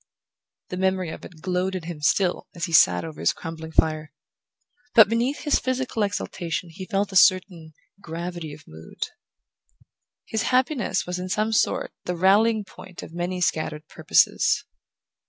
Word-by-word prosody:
The 180 Hz, -, -4 dB
memory 185 Hz, -2 st, 0 dB
of -, -, -9 dB
it 160 Hz, -3 st, -14 dB
glowed 185 Hz, +1 st, -1 dB
in 185 Hz, -, -4 dB
him 165 Hz, -2 st, -7 dB
still 175 Hz, +5 st, +1 dB
as 170 Hz, -, -2 dB
he 165 Hz, -, -7 dB
sat 90 Hz, -, +5 dB
over 80 Hz, -1 st, -9 dB
his 85 Hz, -, +2 dB
crumbling 160 Hz, 0 st, -8 dB
fire; 155 Hz, -1 st, +1 dB, 0.8 s
but 220 Hz, -3 st, +9 dB
beneath 235 Hz, +6 st, 0 dB
his 295 Hz, -, +2 dB
physical 255 Hz, -3 st, -2 dB
exultation 180 Hz, -4 st, -3 dB
he 185 Hz, +3 st, -8 dB
felt 200 Hz, -1 st, -1 dB
a -, -, -8 dB
certain 180 Hz, -4 st, +3 dB, 0.3 s
gravity 170 Hz, -2 st, -6 dB
of 145 Hz, +1 st, -12 dB
mood. 80 Hz, +1 st, -7 dB, 1.2 s
His 220 Hz, -, -2 dB
happiness 255 Hz, -, +1 dB
was 180 Hz, 0 st, -4 dB
in 185 Hz, 0 st, -5 dB
some 215 Hz, +3 st, 0 dB
sort -, -, +1 dB
the 180 Hz, -, -2 dB
rallying 210 Hz, +4 st, +4 dB
point 185 Hz, -1 st, -12 dB
of -, -, -11 dB
many 175 Hz, +1 st, -3 dB
scattered 155 Hz, -2 st, -1 dB
purposes. -, -, +2 dB
180 Hz, 155 wpm, -24 LUFS, 160-200 Hz, 1.2 s, but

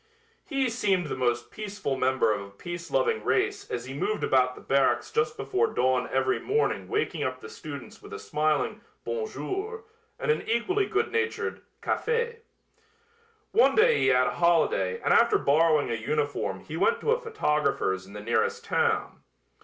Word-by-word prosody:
Hy 275 Hz, -3 st, +1 dB
seemed 205 Hz, -7 st, +1 dB
the 150 Hz, -, -3 dB
most 120 Hz, -2 st, -1 dB
peaceful 205 Hz, -9 st, -4 dB
member 130 Hz, -4 st, +2 dB
of 105 Hz, -, -3 dB
a 100 Hz, -, -9 dB
peace 170 Hz, +12 st, -7 dB
loving 460 Hz, -1 st, +1 dB
race 405 Hz, +1 st, 0 dB
as 120 Hz, 0 st, -4 dB
he 130 Hz, -, -7 dB
moved 210 Hz, +9 st, -2 dB
about 125 Hz, -1 st, +3 dB
the -, -, -12 dB
barracks 135 Hz, 0 st, +1 dB
just 450 Hz, 0 st, 0 dB
before 415 Hz, +4 st, +1 dB
dawn 130 Hz, -1 st, +1 dB
every 130 Hz, 0 st, +1 dB
morning 440 Hz, +2 st, 0 dB
waking 430 Hz, +1 st, -1 dB
up -, -, -3 dB
the -, -, -10 dB
students -, -, -9 dB
with -, -, -13 dB
a -, -, -5 dB
smiling 155 Hz, -, -1 dB, 0.2 s
"Bon 465 Hz, -2 st, -2 dB
jour" 435 Hz, +2 st, -5 dB, 0.3 s
and 460 Hz, -, +1 dB
an 455 Hz, -, 0 dB
equally 370 Hz, -, +1 dB
good -, -, 0 dB
natured 460 Hz, 0 st, -2 dB, 0.2 s
"Café." 470 Hz, 0 st, 0 dB, 1.1 s
One 460 Hz, -, +4 dB
day 465 Hz, +1 st, +5 dB
he -, -, +2 dB
had 125 Hz, 0 st, +4 dB
a -, -, 0 dB
holiday 160 Hz, -, +2 dB
and -, -, +2 dB
after -, -, +5 dB
borrowing 150 Hz, -2 st, +3 dB
a -, -, 0 dB
uniform 115 Hz, -4 st, -2 dB
he 155 Hz, -, -8 dB
went 465 Hz, -, +2 dB
to 455 Hz, -, +1 dB
a 480 Hz, +1 st, +2 dB
photographer's 150 Hz, -, 0 dB
in 100 Hz, -, -13 dB
the 105 Hz, -, -7 dB
nearest 115 Hz, +3 st, 0 dB
town. -, -, 0 dB
170 Hz, 175 wpm, -27 LUFS, -, 1.1 s, day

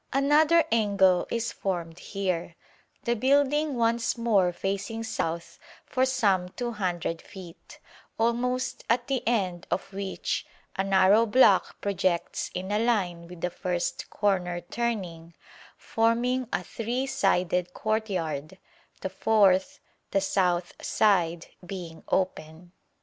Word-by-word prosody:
Another 300 Hz, +4 st, +4 dB
angle 200 Hz, -5 st, +3 dB
is 230 Hz, 0 st, -1 dB
formed 175 Hz, -3 st, -4 dB
here, 180 Hz, -4 st, -3 dB, 0.5 s
the 235 Hz, -, +1 dB
building 285 Hz, +4 st, +2 dB
once 230 Hz, 0 st, +1 dB
more 205 Hz, -6 st, +3 dB
facing 195 Hz, +5 st, -3 dB
south 170 Hz, -6 st, -4 dB, 0.3 s
for 260 Hz, 0 st, +1 dB
some 195 Hz, -8 st, +1 dB
200 185 Hz, -8 st, -3 dB
feet, 180 Hz, -4 st, -13 dB, 0.4 s
almost 245 Hz, +2 st, 0 dB
at 240 Hz, +1 st, +2 dB
the 270 Hz, -1 st, -1 dB
end 190 Hz, -7 st, 0 dB
of 195 Hz, -, -3 dB
which 195 Hz, 0 st, -3 dB, 0.3 s
a 195 Hz, -, 0 dB
narrow 195 Hz, +3 st, +4 dB
block 215 Hz, -4 st, +4 dB
projects 185 Hz, -3 st, -1 dB
in 185 Hz, +2 st, -4 dB
a 210 Hz, -, +2 dB
line 185 Hz, -8 st, 0 dB
with 175 Hz, -1 st, -11 dB
the 180 Hz, -, -1 dB
first 175 Hz, -1 st, -3 dB
corner 180 Hz, -4 st, 0 dB
turning, 175 Hz, -7 st, -4 dB, 0.4 s
forming 240 Hz, +2 st, +1 dB
a 180 Hz, -, -1 dB
three 235 Hz, +7 st, -3 dB
sided 180 Hz, -8 st, +1 dB
courtyard, 190 Hz, -7 st, -2 dB, 0.4 s
the 190 Hz, -, -3 dB
fourth 190 Hz, -2 st, +3 dB, 0.3 s
the 195 Hz, -, +2 dB
south 180 Hz, -2 st, 0 dB
side 175 Hz, -6 st, +2 dB, 0.2 s
being 175 Hz, -3 st, -7 dB
open. 175 Hz, -2 st, -2 dB
195 Hz, 115 wpm, -27 LUFS, 180-235 Hz, 0.5 s, Another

